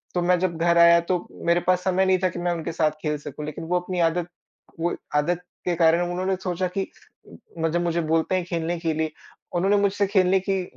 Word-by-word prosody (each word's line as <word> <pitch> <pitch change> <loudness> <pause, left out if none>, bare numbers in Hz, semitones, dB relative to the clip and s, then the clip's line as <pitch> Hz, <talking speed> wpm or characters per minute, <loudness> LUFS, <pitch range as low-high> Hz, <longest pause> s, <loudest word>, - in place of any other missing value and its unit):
तो 175 - +1
मैं 180 +1 +3
जब 180 -2 -1
घर 170 +1 +2
आया, 170 0 +7
तो 175 +1 -2 0.2
मेरे 170 +1 +3
पास 180 0 +3
समय 190 0 +2
नहीं 185 -1 +3
था 185 - +5
कि 175 - -7
मैं 175 0 0
उनके 165 0 -4
साथ 155 -1 +1
खेल 150 -1 -1
सकूँ 150 +1 -7
लेकिन 150 +1 -6
वो 180 +1 +1
अपनी 180 0 -4
आदत 170 +1 +1 0.5
वो 170 +1 0 0.2
आदत 165 +4 +1 0.2
के 175 - +1
कारण 165 +1 +4
उन्होंने 185 +2 -1
सोचा 185 0 -1
कि 195 - 0 0.7
जब 165 +2 0
म - - -1
मुझे 170 0 0
बोलते 160 +3 +1
हैं 185 - 0
खेलने 170 0 -2
के 165 -1 -1
लिए 160 0 -1 0.4
उन्होंने 195 +4 +3
मुझसे 200 0 +2
खेलने 190 -1 +3
की 190 0 -1
175 Hz, 225 wpm, -24 LUFS, 165-185 Hz, 0.7 s, आया